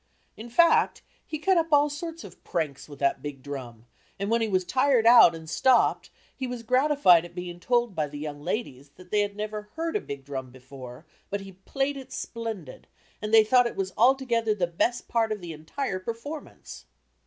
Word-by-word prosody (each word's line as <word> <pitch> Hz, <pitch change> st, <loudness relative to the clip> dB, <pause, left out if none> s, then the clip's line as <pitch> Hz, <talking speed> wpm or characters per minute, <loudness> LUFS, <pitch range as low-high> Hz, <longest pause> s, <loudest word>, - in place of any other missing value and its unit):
In 225 Hz, +2 st, -9 dB
fact, 335 Hz, +7 st, +3 dB, 0.2 s
he 310 Hz, -, -5 dB
cut 370 Hz, +4 st, +2 dB
up 330 Hz, -1 st, 0 dB
all 290 Hz, 0 st, +5 dB
sorts 330 Hz, +3 st, -6 dB
of -, -, -13 dB
pranks 150 Hz, -4 st, -3 dB
with 145 Hz, -, -10 dB
that 140 Hz, -1 st, 0 dB
big 140 Hz, -3 st, -7 dB
drum 125 Hz, -5 st, -8 dB, 0.3 s
and 200 Hz, +2 st, -3 dB
when 230 Hz, 0 st, +2 dB
he 225 Hz, -, +1 dB
was 185 Hz, -3 st, 0 dB
tired 255 Hz, +2 st, +2 dB
out 230 Hz, -8 st, +8 dB
and 160 Hz, -1 st, -10 dB
stopped, 250 Hz, +9 st, +2 dB, 0.3 s
he 260 Hz, -, -4 dB
was 245 Hz, -2 st, -6 dB
gratified 255 Hz, -, +4 dB
at 175 Hz, 0 st, -12 dB
being 175 Hz, -1 st, -6 dB
told 240 Hz, +1 st, +1 dB
by 155 Hz, -3 st, -1 dB
the 145 Hz, 0 st, -9 dB
"young 145 Hz, -1 st, -6 dB
ladies" 145 Hz, -, -4 dB
that 180 Hz, 0 st, -16 dB
they 210 Hz, -, +2 dB
had 205 Hz, 0 st, -2 dB
never 210 Hz, 0 st, -5 dB
heard 330 Hz, +2 st, -3 dB
a 420 Hz, -, +1 dB
big 140 Hz, -1 st, -8 dB
drum 130 Hz, -2 st, -5 dB
before, 130 Hz, +2 st, -12 dB, 0.2 s
but 200 Hz, 0 st, -3 dB
he 195 Hz, 0 st, -10 dB
"played 270 Hz, +9 st, -3 dB
it 265 Hz, -, -10 dB
splendid," 220 Hz, -, -6 dB, 0.3 s
and 210 Hz, 0 st, -4 dB
they 225 Hz, -1 st, +8 dB
thought 245 Hz, +2 st, +4 dB
it -, -, -7 dB
was 190 Hz, -1 st, -3 dB
altogether 235 Hz, -2 st, +2 dB
the 185 Hz, -4 st, +1 dB
best 175 Hz, +8 st, -1 dB
part 225 Hz, -2 st, +1 dB
of 215 Hz, -, -2 dB
the 175 Hz, -3 st, -7 dB
entire 185 Hz, -, -4 dB
performance! 230 Hz, +10 st, -8 dB
210 Hz, 200 wpm, -26 LUFS, 160-250 Hz, 0.3 s, out